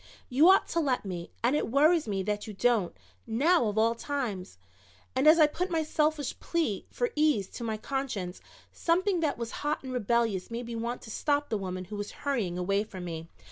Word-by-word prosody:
You 290 Hz, +8 st, +6 dB
ought 385 Hz, -, +5 dB
to 335 Hz, -, 0 dB
let 265 Hz, -8 st, 0 dB
me, 175 Hz, -3 st, -5 dB
and 250 Hz, +5 st, +3 dB
it 300 Hz, -, 0 dB
worries 300 Hz, +4 st, +4 dB
me 195 Hz, -2 st, -1 dB
that 210 Hz, +2 st, -2 dB
you 210 Hz, -, -7 dB
don't, 225 Hz, -, +1 dB, 0.3 s
now 280 Hz, +3 st, +3 dB
of 210 Hz, 0 st, -2 dB
all 225 Hz, +1 st, +4 dB
times," 230 Hz, -, -4 dB, 0.6 s
and 265 Hz, +3 st, +3 dB
as 315 Hz, +2 st, +8 dB
I 310 Hz, -, +8 dB
put 360 Hz, +5 st, -2 dB
my 325 Hz, -2 st, +1 dB
selfish 305 Hz, -2 st, 0 dB
plea 315 Hz, -, -1 dB
for 485 Hz, -, -1 dB
ease 295 Hz, -10 st, +2 dB
to -, -, -7 dB
my 220 Hz, -2 st, -2 dB
conscience, 215 Hz, -7 st, -4 dB, 0.3 s
something 360 Hz, +2 st, +1 dB
that 310 Hz, -3 st, 0 dB
was 235 Hz, -1 st, -4 dB
hot 295 Hz, 0 st, -1 dB
and 260 Hz, -1 st, -5 dB
rebellious 230 Hz, -5 st, 0 dB
made 235 Hz, +1 st, -4 dB
me 235 Hz, 0 st, -5 dB
want 235 Hz, +2 st, -3 dB
to 220 Hz, -, -9 dB
stop 290 Hz, +4 st, 0 dB
the 220 Hz, -, 0 dB
woman 185 Hz, -1 st, -4 dB
who 205 Hz, +3 st, -7 dB
was 205 Hz, 0 st, -4 dB
hurrying 230 Hz, -11 st, -1 dB
away 195 Hz, +3 st, +1 dB
from 190 Hz, -4 st, -8 dB
me. 165 Hz, -1 st, -6 dB
235 Hz, 210 wpm, -29 LUFS, 205-300 Hz, 0.6 s, as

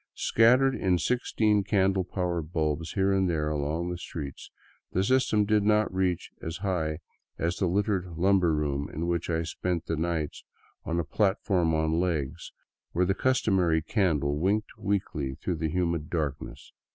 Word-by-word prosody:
Scattered 125 Hz, +4 st, +4 dB
in 95 Hz, -7 st, +1 dB
sixteen 110 Hz, -2 st, +1 dB
candle 95 Hz, -1 st, +2 dB
power 90 Hz, -2 st, -2 dB
bulbs 80 Hz, 0 st, -2 dB
here 95 Hz, 0 st, +2 dB
and 95 Hz, -1 st, +2 dB
there 75 Hz, -3 st, 0 dB
along 75 Hz, +4 st, -2 dB
the 90 Hz, -, -5 dB
streets, 75 Hz, -5 st, -7 dB, 0.4 s
the 95 Hz, -, +2 dB
system 110 Hz, -2 st, +2 dB
did 105 Hz, 0 st, +3 dB
not 105 Hz, -1 st, +2 dB
reach 95 Hz, -2 st, -1 dB
as 80 Hz, +1 st, -4 dB
high 80 Hz, -5 st, -1 dB, 0.4 s
as 85 Hz, +2 st, -1 dB
the 95 Hz, -, +1 dB
littered 95 Hz, 0 st, 0 dB
lumber 90 Hz, -1 st, +3 dB
room 70 Hz, -1 st, -1 dB
in 80 Hz, +3 st, -3 dB
which 85 Hz, 0 st, -1 dB
I 80 Hz, -1 st, 0 dB
spent 85 Hz, 0 st, -3 dB
the 80 Hz, -, -1 dB
nights 80 Hz, -1 st, -2 dB, 0.4 s
on 85 Hz, +1 st, -1 dB
a -, -, +1 dB
platform 95 Hz, -3 st, +1 dB
on 80 Hz, +1 st, +1 dB
legs, 85 Hz, -3 st, -2 dB, 0.4 s
where 90 Hz, +2 st, +2 dB
the 95 Hz, -, +2 dB
customary 95 Hz, -10 st, +2 dB
candle 75 Hz, -7 st, +1 dB
winked 105 Hz, +5 st, 0 dB
weakly 85 Hz, -9 st, -2 dB
through 85 Hz, +4 st, -3 dB
the 80 Hz, 0 st, -1 dB
humid 85 Hz, -2 st, -1 dB
darkness. 75 Hz, -5 st, -4 dB
85 Hz, 160 wpm, -28 LUFS, 80-95 Hz, 0.4 s, Scattered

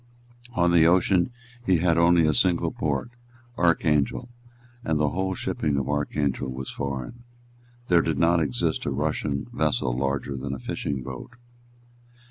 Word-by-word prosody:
On 85 Hz, 0 st, +3 dB
the 85 Hz, -2 st, +6 dB
ocean 90 Hz, +3 st, +3 dB, 0.3 s
he 95 Hz, -6 st, +3 dB
had 85 Hz, 0 st, +2 dB
only 85 Hz, 0 st, +5 dB
a 75 Hz, -, +3 dB
single 85 Hz, -1 st, +2 dB
port, 75 Hz, -, -2 dB, 0.4 s
Archangel; 85 Hz, -, +1 dB, 0.5 s
and 80 Hz, -1 st, 0 dB
the 75 Hz, -1 st, +2 dB
whole 95 Hz, +3 st, -2 dB
shipping 75 Hz, -5 st, -1 dB
of 70 Hz, -, -1 dB
Archangel 75 Hz, -2 st, -1 dB
was 65 Hz, +1 st, -6 dB
foreign. 70 Hz, -, -5 dB, 0.6 s
There 85 Hz, -1 st, +5 dB
did 80 Hz, -3 st, -1 dB
not 85 Hz, +3 st, +3 dB
exist 65 Hz, -6 st, -1 dB
a -, -, 0 dB
Russian 70 Hz, 0 st, -1 dB
vessel 60 Hz, -1 st, 0 dB
larger 70 Hz, +1 st, -2 dB
than 65 Hz, +1 st, -4 dB
a -, -, -8 dB
fishing 65 Hz, +1 st, -3 dB
boat. 65 Hz, -, -8 dB
75 Hz, 145 wpm, -25 LUFS, 70-85 Hz, 0.6 s, the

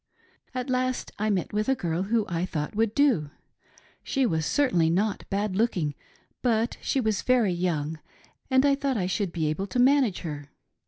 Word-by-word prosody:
At 255 Hz, +1 st, -2 dB
last 255 Hz, 0 st, -1 dB
I 215 Hz, +1 st, +1 dB
met 195 Hz, -2 st, -1 dB
with 215 Hz, +3 st, 0 dB
a 270 Hz, -, +4 dB
girl 170 Hz, -5 st, -2 dB
who 215 Hz, +2 st, +1 dB
I 170 Hz, -1 st, -2 dB
thought 155 Hz, -1 st, -3 dB
would 225 Hz, 0 st, +1 dB
do. 255 Hz, -, +3 dB, 0.7 s
She 270 Hz, -2 st, 0 dB
was 160 Hz, -7 st, 0 dB
certainly 180 Hz, -, +2 dB
not 200 Hz, +4 st, -1 dB
bad 200 Hz, 0 st, -1 dB
looking, 185 Hz, -9 st, +1 dB, 0.5 s
but 230 Hz, -1 st, +1 dB
she 275 Hz, -, 0 dB
was 220 Hz, -5 st, 0 dB
very 240 Hz, -7 st, +3 dB
young 160 Hz, -3 st, -2 dB, 0.5 s
and 260 Hz, +1 st, +4 dB
I 280 Hz, -, +5 dB
thought 275 Hz, -2 st, -1 dB
I 185 Hz, -, 0 dB
should 190 Hz, 0 st, -1 dB
be 165 Hz, -2 st, -2 dB
able 155 Hz, +6 st, -1 dB
to 200 Hz, -, -4 dB
manage 255 Hz, -5 st, +3 dB
her. 145 Hz, -4 st, -6 dB
205 Hz, 180 wpm, -26 LUFS, 170-250 Hz, 0.7 s, I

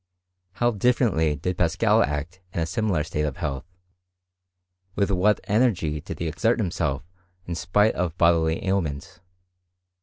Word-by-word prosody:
How 120 Hz, +4 st, +1 dB
differently 105 Hz, -, +2 dB
did 90 Hz, +5 st, -3 dB
Paschal 100 Hz, +6 st, +3 dB
act 80 Hz, +4 st, -3 dB
in -, -, -2 dB
a 80 Hz, -, +1 dB
similar 95 Hz, -4 st, 0 dB
state 75 Hz, -1 st, -3 dB
of 75 Hz, -3 st, -2 dB
health! 70 Hz, -1 st, -4 dB, 1.3 s
With 100 Hz, 0 st, +1 dB
what 100 Hz, +3 st, +3 dB
energy 100 Hz, -, +1 dB
did -, -, -7 dB
he 85 Hz, -, -3 dB
exert 110 Hz, +9 st, +1 dB
himself 85 Hz, -, -1 dB, 0.4 s
in 85 Hz, -, -4 dB
spite 90 Hz, +6 st, +2 dB
of 85 Hz, -1 st, -2 dB
bodily 85 Hz, -1 st, +2 dB
ailment! 95 Hz, -1 st, -2 dB
85 Hz, 140 wpm, -24 LUFS, 80-105 Hz, 1.3 s, Paschal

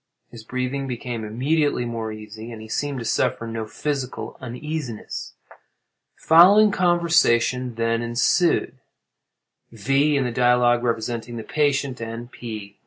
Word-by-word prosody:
His 115 Hz, -2 st, -11 dB
breathing 130 Hz, +3 st, -3 dB
became 120 Hz, -2 st, -4 dB
immediately 135 Hz, +5 st, 0 dB
more 115 Hz, -2 st, -4 dB
easy, 110 Hz, +2 st, -9 dB
and 115 Hz, -, -8 dB
he 110 Hz, -, -10 dB
seemed 140 Hz, +5 st, -2 dB
to 115 Hz, -, -5 dB
suffer 115 Hz, -, 0 dB
no 115 Hz, -1 st, -5 dB
physical 135 Hz, +1 st, -4 dB
uneasiness. 130 Hz, -1 st, -6 dB, 0.8 s
The -, -, -20 dB
following 200 Hz, +6 st, +7 dB
conversation 160 Hz, -10 st, +2 dB
then 115 Hz, 0 st, 0 dB
ensued:—V. 135 Hz, -, -1 dB
in 135 Hz, -, +1 dB
the 125 Hz, -, -2 dB
dialogue 120 Hz, 0 st, +3 dB
representing 120 Hz, 0 st, -3 dB
the 110 Hz, -, -5 dB
patient, 140 Hz, -3 st, 0 dB
and 115 Hz, +1 st, -6 dB
P. 105 Hz, -4 st, -8 dB
120 Hz, 125 wpm, -23 LUFS, 115-140 Hz, 0.8 s, following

